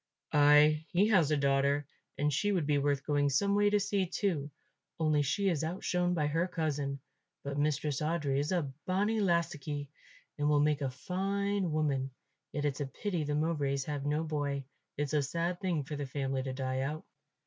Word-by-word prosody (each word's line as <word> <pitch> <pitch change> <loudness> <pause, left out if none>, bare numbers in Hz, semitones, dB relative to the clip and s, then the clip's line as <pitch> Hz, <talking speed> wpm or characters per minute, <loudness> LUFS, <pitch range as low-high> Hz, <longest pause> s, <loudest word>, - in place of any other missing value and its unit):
"Ay, 150 +1 +6
he 200 +5 +3
has 180 -9 +4
a 150 - +2
daughter, 140 +1 +2 0.3
and 150 0 +1
she 205 +9 +1
would 180 -6 +1
be 145 -1 +2
worth 140 -1 0
going 145 -1 +2
some 200 +9 +2
way 205 0 +4
to 205 0 +3
see 200 -2 0
too; 170 -6 -1 0.5
only 155 -2 +3
she 195 +9 0
is 165 -5 +1
outshone 180 +1 0
by 155 -3 +1
her 165 +4 +1
cousin. 145 -5 -2 0.4
But 140 0 -3
Mistress 150 -1 0
Audry 150 -3 0
is 145 +4 -1
a 180 -3 +1 0.2
bonnie 205 +4 +1
lassockie 150 -6 -1 0.5
and 145 0 +2
will 150 -1 +4
make 150 0 +2
a 135 - 0
fine 195 +6 -1
woman. 140 -4 0 0.4
Yet 145 0 -2
it's 145 -1 -1
a 140 - -1
pity 175 +3 -3
the 145 0 -1
Mowbrays 145 -3 0
have 145 -2 -3
no 150 +2 0
boy. 145 -3 -2 0.3
It's 145 0 -2
a 150 - +3
sad 170 +5 -2
thing 175 -6 0
for 150 +2 -6
the 145 -1 -4
family 135 0 -2
to 130 0 -4
die 130 0 -2
out." 150 +4 -3
150 Hz, 190 wpm, -32 LUFS, 140-175 Hz, 0.5 s, Ay